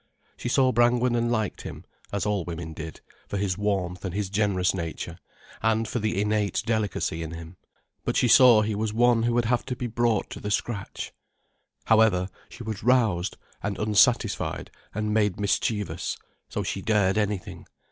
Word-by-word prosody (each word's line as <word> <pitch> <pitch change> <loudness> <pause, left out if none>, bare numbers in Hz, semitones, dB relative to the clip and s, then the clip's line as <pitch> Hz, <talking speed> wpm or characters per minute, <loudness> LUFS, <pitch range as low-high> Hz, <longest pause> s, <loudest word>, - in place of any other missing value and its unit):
She - - -4
saw 130 0 +4
Brangwen 120 +1 +3
and 120 0 +1
liked 110 -4 -1
him, - - -8 0.3
as 100 0 -1
all 105 -3 0
women 80 -1 -6
did, 80 +1 -8 0.3
for 100 - -3
his 95 -2 0
warmth 95 -3 -1
and 95 -2 -4
his 100 -2 -2
generous 100 -3 +2
nature, 85 -4 -5 0.4
and 110 0 +1
for 120 - -2
the 110 -2 -1
innate 105 -1 0
delicacy 105 -7 -1
in 80 - -4
him. 85 +2 -9 0.5
But - - -1
she 125 - +4
saw 120 -2 +7
he 105 0 -1
was 105 +1 -2
one 120 0 +4
who 120 +1 +1
would 120 -1 +2
have 120 +1 +1
to 125 - -3
be 125 - -4
brought 115 -2 0
to - - -6
the 105 - -4
scratch. 105 0 -3 0.7
However, 105 -4 +4 0.2
she 120 - -9
was 110 -3 -5
roused 110 -7 +2 0.2
and 100 0 -3
unsatisfied 110 +1 +2 0.2
and 105 +1 -2
made 105 -3 +1
mischievous, 105 0 -1 0.3
so - - -2
she 95 - -3
dared 105 -1 +2
anything. 105 -2 -3
105 Hz, 175 wpm, -26 LUFS, 95-115 Hz, 0.7 s, saw